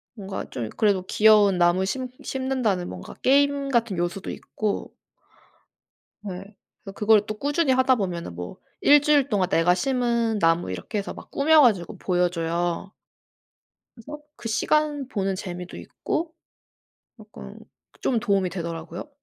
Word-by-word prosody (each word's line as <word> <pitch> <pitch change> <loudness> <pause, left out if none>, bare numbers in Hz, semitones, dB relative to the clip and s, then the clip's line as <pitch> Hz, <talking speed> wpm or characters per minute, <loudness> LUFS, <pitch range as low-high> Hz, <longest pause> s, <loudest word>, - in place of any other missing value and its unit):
뭔가 195 -2 -6
좀 115 -4 -5
그래도 200 -4 +2
'귀여운 210 -3 +5
나무 175 +2 +3
심 255 +6 -3
심는다.'는 255 -9 -1
뭔가 90 -1 -9
게임 280 +1 +3
같은 230 -7 0
요소도 175 +3 -3
있고 215 -2 -4 1.3
네. 195 +2 -8 0.3
그래서 195 0 -9
그걸 210 -1 +3
또 215 - -4
꾸준히 290 0 +1
하다 260 0 +3
보면은 175 - -4
뭐 90 0 -7 0.2
"1 290 0 +6
주일 290 -2 +3
동안 190 -4 +1
내가 175 0 +3
심은 235 0 0
나무." 165 - +2
이렇게 95 - -4
해서 200 - -4
막 - - -13
꾸며 310 +2 +4
가지고 205 -4 +2
보여 180 -1 +1
줘요. 170 +2 -2 1.0
그래서 295 +6 -9 0.2
그 230 - -6
시간 295 +4 +1
보는 195 -4 -1
재미도 180 -2 -7
있고 325 0 -4 0.9
약간 215 0 -12 0.4
좀 240 -4 +1
도움이 195 -5 +1
되더라고요. 170 - -6
205 Hz, 285 characters per minute, -24 LUFS, 180-255 Hz, 1.3 s, 1